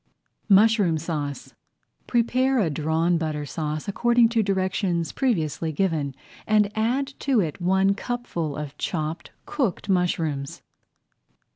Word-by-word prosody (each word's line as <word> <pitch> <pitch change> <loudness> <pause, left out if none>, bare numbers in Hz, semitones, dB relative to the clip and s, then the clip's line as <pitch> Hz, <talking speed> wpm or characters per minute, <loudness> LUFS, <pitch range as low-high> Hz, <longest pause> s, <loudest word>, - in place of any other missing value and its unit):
MUSHROOM 205 -4 +5
SAUCE 150 -3 -4 0.5
Prepare 255 +3 +2
a 185 -9 +2
Drawn 160 +3 +1
Butter 155 -2 -3
Sauce 155 0 -4
according 235 +3 +3
to 230 -1 0
[Page 210 - +1
31] 195 - +2
directions 185 -3 -1
previously 165 - -1
given 155 -5 -1 0.3
and 210 -1 +2
add 255 +6 0
to 270 -4 +2
it 170 -2 -2
one 190 +2 +3
cupful 200 - -4
of 150 -1 -6
chopped 155 -1 -3 0.2
cooked 220 - -2
mushrooms. 160 -6 -1
180 Hz, 125 wpm, -24 LUFS, 155-220 Hz, 0.5 s, MUSHROOM